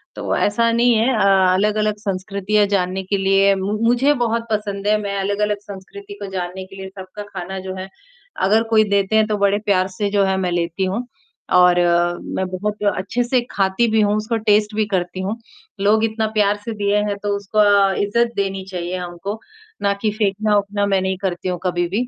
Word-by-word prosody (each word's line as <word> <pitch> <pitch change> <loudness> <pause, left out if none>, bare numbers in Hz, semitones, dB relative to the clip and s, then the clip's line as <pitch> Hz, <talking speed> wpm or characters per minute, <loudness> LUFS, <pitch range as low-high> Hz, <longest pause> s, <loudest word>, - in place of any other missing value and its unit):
तो - - -2
ऐसा 230 +3 +2
नहीं 240 +1 +4
है 225 +4 +2
अ, 195 -3 +4
अलग-अलग 210 +2 +1
संस्कृतियाँ 200 +1 0
जानने 190 -1 0
के 200 +1 -1
लिए 195 +1 +3
मु 200 +3 -2
मुझे 260 +5 +3
बहुत 230 0 0
पसंद 205 -1 -2
है, 215 - +4
मैं 200 -1 -3
अलग-अलग 205 +1 0
संस्कृति 210 - -10
को - - -4
जानने 185 0 -4
के 195 +1 -14
लिए 190 0 -7
सबका 190 +1 -9
खाना 190 -1 -6
जो 185 - -4
है, 190 +1 -6 0.6
अगर 220 +3 +3
कोई 220 -1 +5
देते 200 +1 +1
हैं 215 0 +3
तो 210 -1 -1
बड़े 200 0 +2
प्यार 185 -2 +2
से 205 -1 0
जो 200 -1 +3
है 190 0 +1
मैं 180 -2 -1
लेती 175 +2 -1
हूँ। 215 +7 -2 0.5
और 180 0 +6 0.6
मैं 190 - -1
बहुत 210 +3 -3
अच्छे 215 +6 -1
से 245 0 +1
खाती 195 +4 +1
भी 220 - +3
हूँ, 205 0 +2
उसको 220 +2 -1
टेस्ट 210 +1 +3
भी 215 0 +1
करती 180 0 -1
हूँ, 205 +5 -3 0.4
लोग 210 +2 +3
इतना 220 0 -1
प्यार 205 0 +3
से 230 - -3
दिए 200 +1 +2
हैं, 200 - -2
तो 205 0 0
उसको 200 -1 +3
इज्जत 235 +3 +1
देनी 195 -1 -2
चाहिए 180 0 -3
हमको, 180 +4 -6 0.4
ना 200 0 +2
कि 215 - +1
फेंकना-वेंकना 205 0 +1
मैं 195 -2 +1
नहीं 190 0 -1
करती 185 -1 -2
हूँ 180 -2 -3
कभी 175 -1 0
भी। 235 +7 -1
200 Hz, 200 wpm, -20 LUFS, 190-215 Hz, 0.6 s, और